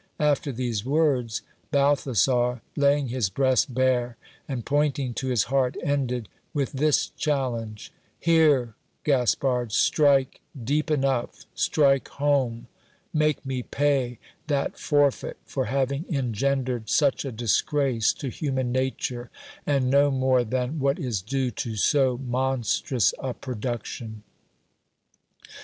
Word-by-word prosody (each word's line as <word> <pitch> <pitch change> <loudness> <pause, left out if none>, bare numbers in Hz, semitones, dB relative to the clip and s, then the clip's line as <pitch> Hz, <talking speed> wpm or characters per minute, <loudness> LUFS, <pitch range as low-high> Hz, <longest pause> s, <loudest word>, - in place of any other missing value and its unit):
After 145 -1 +1
these 120 -4 -2
words, 130 -5 +1 0.3
Balthasar, 130 -4 +2
laying 140 -2 +2
his 120 -5 0
breast 130 +5 +2
bare, 125 -2 +1 0.3
and 130 -5 -4
pointing 140 -3 0
to 130 - -4
his 125 -5 +2
heart, 130 0 0
ended 130 -7 -1 0.3
with 140 -2 0
this 150 +2 +1
challenge: 120 -7 -3 0.3
Here, 150 -8 +3 0.3
Gaspard, 125 -3 +1
strike 140 +2 +3 0.2
deep 150 +6 0
enough, 135 -5 -1
strike 140 -3 +2
home; 140 -5 0 0.5
make 155 -2 +1
me 130 -1 -2
pay 135 -3 0 0.3
that 140 -2 -1
forfeit 145 -2 +1
for - - -2
having 135 - -1
engendered 130 - -1
such 140 -3 +2
a 135 - -4
disgrace 120 +1 +1
to 135 - -5
human 130 -2 -2
nature, 130 -1 -2 0.4
and 135 -3 +2
no 140 +1 +5
more 130 -2 +2
than 125 +6 -2
what 140 0 +1
is 115 -7 -2
due 130 +4 -1
to 115 -1 -4
so 130 +2 +2
monstrous 130 -2 0
a 130 -2 -4
pro 130 - -6
duction. 110 -1 -5
130 Hz, 120 wpm, -25 LUFS, 120-140 Hz, 0.5 s, no